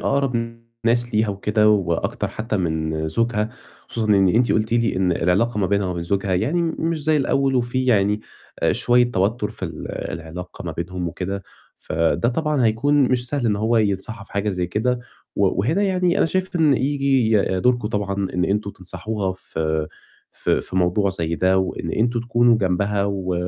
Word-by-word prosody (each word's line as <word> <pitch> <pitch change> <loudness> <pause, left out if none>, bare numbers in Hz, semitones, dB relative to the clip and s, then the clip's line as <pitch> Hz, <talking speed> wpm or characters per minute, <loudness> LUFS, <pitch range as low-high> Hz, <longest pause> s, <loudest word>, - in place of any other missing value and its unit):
أقرَب 120 -4 -1 0.3
ناس 120 0 +1
ليها 110 0 +2
وكده 105 +2 +2
وأكتر 95 -6 0
حتّى 110 0 -3
من 80 -3 -1
زوجها، 110 +4 0 0.4
خصوصًا 115 -2 -2
إن 95 -3 +5
أنتِ 120 +5 +3
قُلتِ 110 +1 0
لي 115 -4 +1
إن 95 -1 +2
العلاقة 100 +8 +1
ما 100 - +2
بينها 100 0 +1
وما 90 - -2
بين 85 - -3
زوجها 95 +1 0
يعني 140 - +1
م 165 -1 -1
مش 165 -1 -1
زي 155 0 +3
الأول 135 -1 +1
وفيه 130 +1 0
يعني 105 -2 +3 0.4
آآ - - +3
شوية 120 0 +3
توتُّر 105 +2 0
في 105 - -7
ال 80 -3 -6 0.2
العلاقة 80 +2 -8
ما - - -4
بينهم 90 +1 -4
وكده، 95 +3 -4 0.3
فده 80 +8 0
طبعًا 150 0 0
هيكون 140 +7 +3
مش 125 -1 +2
سهل 140 -3 -1
إن 105 -2 +2
هو 110 +3 +1
ينصحها 100 0 -1
في - - -18
حاجة 100 +1 -1
زي 90 -2 -2
كده، 120 +7 0 0.4
و 100 - +3
وهنا 160 - +1
يعني 185 -3 +1
أنا - - +3
شايف 185 +2 -2
إن 155 -4 +4
ييجي 135 -4 +2 0.2
دوركم 120 -1 +2
طبعًا 100 -2 -2 0.2
إن 90 0 +1
أنتم 100 +1 -1
تنصحوها 95 +2 -4
في 80 -4 -2 0.5
في - - 0
في 95 - -7
موضوع 95 +2 +2
زي 85 -3 -2
ده 95 +2 +2
وإن 90 -3 -2
أنتم 120 +1 +1
تكونوا 120 0 +3
جنبها 100 +1 0
و 95 -2 -2
105 Hz, 180 wpm, -22 LUFS, 95-120 Hz, 0.5 s, إن